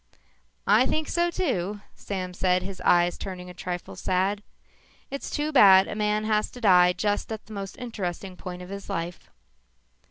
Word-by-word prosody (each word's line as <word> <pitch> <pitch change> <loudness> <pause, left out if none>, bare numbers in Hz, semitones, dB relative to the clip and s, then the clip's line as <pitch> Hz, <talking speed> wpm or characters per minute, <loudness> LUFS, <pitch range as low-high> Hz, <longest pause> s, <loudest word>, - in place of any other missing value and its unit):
"I - - +5
think 310 0 -1
so 345 0 +1
too," 210 - -2
Sam 185 -2 -5
said, 180 0 +1
his 190 0 -7
eyes 175 0 +3
turning 180 -2 -6
a - - -11
trifle 180 0 -6
sad. 190 +3 0 0.7
"It's 275 - -5
too 300 +1 -2
bad 195 -8 +7
a - - -4
man 210 0 0
has 215 0 +1
to 250 - -9
die 180 -4 +6
just 205 +3 -1
at 220 -1 -5
the 220 - -11
most 195 -1 -6
interesting 195 -6 -5
point 180 -1 -7
of 180 - -11
his 200 0 -8
life." 170 +1 -4
195 Hz, 170 wpm, -26 LUFS, 180-215 Hz, 0.7 s, bad